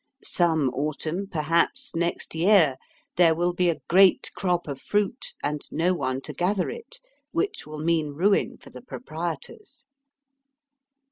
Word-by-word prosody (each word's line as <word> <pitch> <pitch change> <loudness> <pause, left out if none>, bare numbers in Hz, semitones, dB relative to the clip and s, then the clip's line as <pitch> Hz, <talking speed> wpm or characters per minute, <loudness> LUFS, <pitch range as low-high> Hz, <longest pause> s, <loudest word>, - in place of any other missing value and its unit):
Some 160 -6 +2
autumn, 155 +7 -2
perhaps 165 -1 0
next 170 +1 -2
year, 165 -5 +4 0.4
there 165 -2 +5
will 175 +2 +1
be 175 0 +2
a 165 - -2
great 190 +2 +5
crop 180 -3 0
of 140 -2 -5
fruit 210 +4 -1
and 150 0 -1
no 180 +3 +2
one 130 -6 -2
to - - -6
gather 185 +1 0
it, 485 +1 -10 0.3
which 390 - -2
will 155 0 -7
mean 155 -1 0
ruin 195 +6 +2
for - - -16
the - - -10
proprietors. 175 - -7
170 Hz, 140 wpm, -25 LUFS, 155-195 Hz, 0.4 s, there